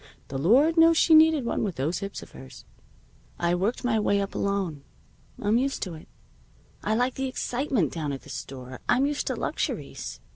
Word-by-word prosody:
The 135 - -3
Lord 270 - +4
knows 330 0 +6
she 325 - +5
needed 315 -4 +6
one, - - -1
with 195 -6 -2
those 150 +7 -1
hips 200 0 -6
of - - -15
hers. 65 0 -12 0.7
I 170 0 +1
worked 195 +9 -1
my 225 -3 +2
way 200 -1 +2
up, 200 0 -3
alone. 190 -8 -2 0.6
I'm 215 +3 +2
used 275 +1 -1
to 185 - -5
it. 155 - -11 0.8
I 215 - +1
like 250 +2 +1
the 265 0 -2
excitement 255 - -1
down 155 -4 -3
at 135 - -6
the - - -14
store. 130 -1 -8
I'm 265 +2 +4
used 290 0 -2
to - - 0
luxuries. - - -4
205 Hz, 190 wpm, -26 LUFS, 165-265 Hz, 0.8 s, knows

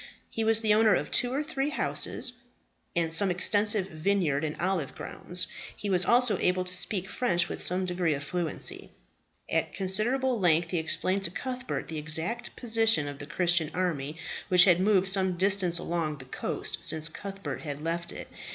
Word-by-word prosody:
He 225 - -2
was 225 0 +4
the 215 -2 +3
owner 215 -2 +5
of - - -3
two 245 - +2
or 280 +3 -1
three 285 -2 -2
horses, 270 -3 -1 0.6
and 170 -1 +2
of - - 0
some 195 +3 +5
extensive 205 +2 +2
vineyards 160 -4 0
and 155 -1 -4
olive 175 -6 -1
grounds. 180 +1 -2 0.3
He 205 - -4
was 180 -1 +2
also 245 -2 +4
able 180 0 +1
to 180 0 -4
speak 190 0 +1
French 180 -7 +1
with - - -6
some 185 +1 0
degree 175 -4 0
of 140 - -6
fluency. 175 +1 -2 0.6
At - - -1
considerable 235 +6 +1
length 165 -2 +3
he 175 - 0
explained 185 +4 0
to - - -1
Cuthbert 255 +6 -5
the 160 -1 -4
exact 160 +10 -4
position 225 - +2
of 145 -1 -7
the 145 - -8
Christian 175 -3 +2
army, 160 -5 -2 0.3
which 180 0 +7
had 180 -3 +5
moved 190 -1 +3
some 190 -2 +2
distance 190 -2 +2
along 165 -4 -2
the 130 - -11
coast 130 - -4
since 160 0 -1
Cuthbert 195 +4 -6
had 145 -2 -5
left 170 +2 -3
it. - - -8
185 Hz, 180 wpm, -28 LUFS, 165-210 Hz, 0.6 s, which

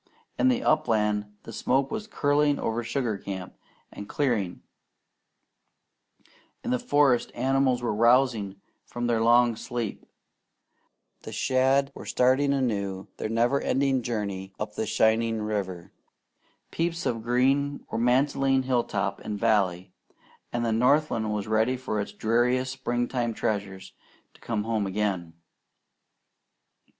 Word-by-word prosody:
In - - +4
the 255 -1 +2
upland 105 -7 +1
the 115 - -9
smoke 135 +5 0
was 215 -1 -4
curling 145 -6 +2
over 115 +1 -2
sugar 115 -4 -2
camp 95 -2 -7 0.4
and 100 - -9
clearing; 115 -11 -1 2.0
in - - -2
the 125 - +1
forests 140 -3 +2
animals 130 0 +1
were 120 - 0
rousing 115 -3 +3 0.3
from 120 0 -5
their 115 -2 +1
long 120 0 +4
sleep; 120 -1 -5 1.2
the - - -8
shad 135 +1 +2
were - - -10
starting 130 +3 +3
anew 100 -8 -1
their - - -3
never 120 +5 +2
ending 135 -1 +1
journey 100 -5 -4
up 105 0 -4
the 110 - -3
shining 110 0 +2
river; 95 -5 -4 0.8
peeps 170 +1 -2
of 115 -2 -1
green 135 +4 +1
were - - -1
mantling 135 +2 +2
hilltop 105 -6 -1
and 105 -1 -5
valley; 95 -5 +1 0.6
and 120 0 -1
the 115 - +1
northland 125 -2 +2
was 105 -2 -2
ready 110 +4 +2
for 110 -5 -2
its 100 - -6
dearest 125 +3 +1
springtime 120 -2 -2
treasures 100 -3 -3 0.4
to - - -22
come 110 -3 -2
home 110 -2 -1
again. 95 -4 -2
120 Hz, 125 wpm, -26 LUFS, 105-130 Hz, 2.0 s, In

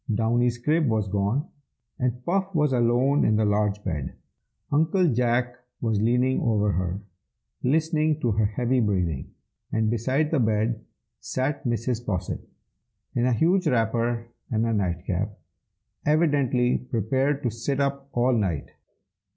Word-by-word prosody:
Downy's 120 +2 +1
crib 150 +5 +1
was 110 -3 +1
gone, 105 - 0 0.5
and 125 0 -2
Puff 190 +1 0
was 150 -3 +2
alone 125 +4 +3
in 110 - +3
the 110 0 +2
large 105 0 +1
bed. 75 -8 -3 0.6
Uncle 160 +5 +3
Jack 120 +1 +1 0.2
was 110 -3 0
leaning 125 +3 +2
over 105 -3 +2
her, 90 +1 -2 0.6
listening 155 +2 +1
to 120 - +1
her 105 0 +2
heavy 125 +4 0
breathing, 90 - 0 0.4
and 110 0 +1
beside 130 +7 0
the 160 - +2
bed 110 0 0 0.4
sat 130 +6 -2
Mrs. 120 0 -1
Posset, 95 -6 -3 0.7
in 125 -2 +1
a 125 - +3
huge 175 - +2
wrapper 115 -2 +1 0.2
and 110 0 +1
a 115 - 0
night 90 -4 -1
cap, 100 +3 -2 0.7
evidently 140 -6 +2
prepared 130 +4 -1
to 120 - 0
sit 125 +5 -2
up 140 0 -1
all 125 +1 +2
night. 95 - -1
120 Hz, 140 wpm, -25 LUFS, 110-135 Hz, 0.7 s, alone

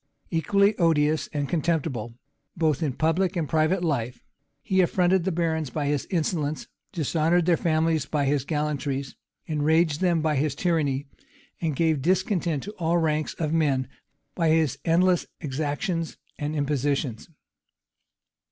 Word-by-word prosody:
Equally 200 +6 +3
odious 155 -3 +2
and 145 -1 -2
contemptible, 145 -8 -1 0.4
both 160 -2 +1
in 150 -5 0
public 170 +6 +1
and 165 -4 -1
private 160 +4 +1
life, 125 -7 -1 0.4
he 190 -2 +2
affronted 180 0 +2
the 190 - +1
barons 160 -3 -1
by 145 +3 -2
his 145 -1 -1
insolence, 155 -4 -1 0.2
dishonored 165 0 +1
their 175 -1 +4
families 160 -2 +1
by 145 -2 0
his 140 -1 +1
gallantries, 145 -3 -2 0.3
enraged 155 +1 +1
them 175 -3 +3
by 155 -2 +1
his 150 +2 0
tyranny, 145 -6 0 0.6
and 160 -4 -1
gave 160 -2 +1
discontent 175 -2 0
to 205 - -6
all 170 0 +2
ranks 155 -2 0
of 155 -1 -2
men 140 -6 +1 0.5
by 165 -3 +1
his 155 -4 +2
endless 175 +1 +3
exactions 155 +4 -2 0.2
and 150 +1 -2
impositions. 140 -4 -1
155 Hz, 135 wpm, -25 LUFS, 145-170 Hz, 0.6 s, their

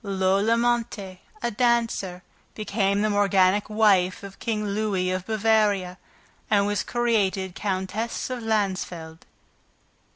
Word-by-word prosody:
Lola 195 +3 +2
Montes, 230 -6 -1 0.2
a 235 - 0
dancer, 230 -6 0 0.3
became 200 -1 0
the 215 - +2
morganatic 200 0 +3
wife 200 -4 +3
of 195 -1 -10
King 215 -2 -2
Louis 200 -3 0
of 185 0 -3
Bavaria 210 -4 +1 0.5
and 200 -2 +3
was 205 -1 0
created 200 -6 0
Countess 205 +6 -3
of 250 -1 -4
Landsfeld. 185 -7 -2
205 Hz, 110 wpm, -25 LUFS, 190-220 Hz, 0.5 s, morganatic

